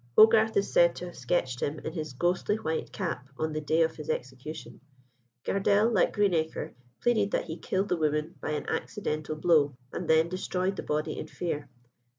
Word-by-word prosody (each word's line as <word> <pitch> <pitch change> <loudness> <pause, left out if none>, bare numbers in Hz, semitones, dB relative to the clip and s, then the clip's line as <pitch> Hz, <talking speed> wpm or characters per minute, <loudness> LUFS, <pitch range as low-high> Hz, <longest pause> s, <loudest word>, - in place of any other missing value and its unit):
Hogarth 220 0 +7
is 200 - 0
said 170 0 +5
to 180 - -6
have 175 - -9
sketched 130 -2 -1
him 145 +2 -1
in 155 - -6
his 155 -5 -4
ghostly 175 +8 +1
white 160 -7 -3
cap 165 -9 -4
on 155 0 -1
the 155 - -2
day 160 +2 +3
of 160 0 -1
his 150 - -7
execution. 130 -1 -5 0.6
Gardelle, 205 +3 +3
like 190 - +3
Greenacre, 175 -6 0 0.3
pleaded 220 -4 +3
that - - 0
he 160 - -5
killed 195 +3 -1
the 180 - +1
woman 150 +1 0
by - - -3
an 150 - -3
accidental 155 -7 -2
blow, 155 -4 +3 0.2
and 175 - -4
then 160 +1 +5
destroyed 185 +1 -1
the - - -4
body 150 0 -2
in - - -5
fear. 155 -4 -4
160 Hz, 185 wpm, -29 LUFS, 150-190 Hz, 0.6 s, Hogarth